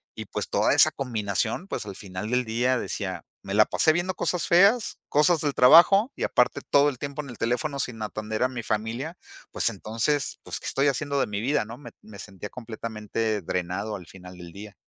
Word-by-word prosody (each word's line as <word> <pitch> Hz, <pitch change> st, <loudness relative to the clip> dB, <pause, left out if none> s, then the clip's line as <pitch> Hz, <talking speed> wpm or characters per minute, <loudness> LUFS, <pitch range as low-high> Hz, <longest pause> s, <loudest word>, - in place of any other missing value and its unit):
Y -, -, -7 dB
pues, -, -, -4 dB
toda -, -, +2 dB
esa -, -, +7 dB
combinación 110 Hz, -, -2 dB
pues 115 Hz, -, -4 dB
al 100 Hz, -2 st, -7 dB
final 95 Hz, +2 st, -6 dB
del 125 Hz, 0 st, +1 dB
día 120 Hz, +3 st, +1 dB
decía: 95 Hz, -3 st, -4 dB, 0.2 s
"Me 100 Hz, 0 st, -5 dB
la 105 Hz, 0 st, +6 dB
pasé 155 Hz, -, +3 dB
viendo 175 Hz, +2 st, -1 dB
cosas 175 Hz, -5 st, -1 dB
feas, 200 Hz, +7 st, +4 dB
cosas 150 Hz, +3 st, +3 dB
del 145 Hz, -2 st, 0 dB
trabajo 175 Hz, -, +7 dB
y -, -, -5 dB
aparte -, -, +1 dB
todo 140 Hz, +1 st, +5 dB
el 130 Hz, -4 st, -8 dB
tiempo 140 Hz, +1 st, -4 dB
en 140 Hz, -, -11 dB
el 120 Hz, -, -9 dB
teléfono 130 Hz, +5 st, -1 dB
sin 120 Hz, -6 st, -4 dB
atender 110 Hz, +2 st, -3 dB
a 130 Hz, -, +2 dB
mi 120 Hz, -3 st, -6 dB
familia", 115 Hz, +11 st, -3 dB, 0.3 s
pues, -, -, +1 dB
entonces: 120 Hz, +6 st, -2 dB
"Pues, -, -, -5 dB
¿qué -, -, -8 dB
estoy 135 Hz, +1 st, +1 dB
haciendo 140 Hz, +1 st, 0 dB
de -, -, +1 dB
mi 105 Hz, 0 st, -3 dB
vida?", 135 Hz, -1 st, 0 dB
¿no? 115 Hz, +3 st, -9 dB
Me 145 Hz, -, -11 dB
me 105 Hz, -2 st, -13 dB
sentía 95 Hz, +1 st, -8 dB
completamente 110 Hz, -2 st, -4 dB
drenado 90 Hz, +4 st, -3 dB
al 90 Hz, -, -12 dB
final 90 Hz, -1 st, -12 dB
del 85 Hz, -1 st, -10 dB
día. 105 Hz, 0 st, -10 dB
115 Hz, 210 wpm, -25 LUFS, 105-145 Hz, 0.3 s, esa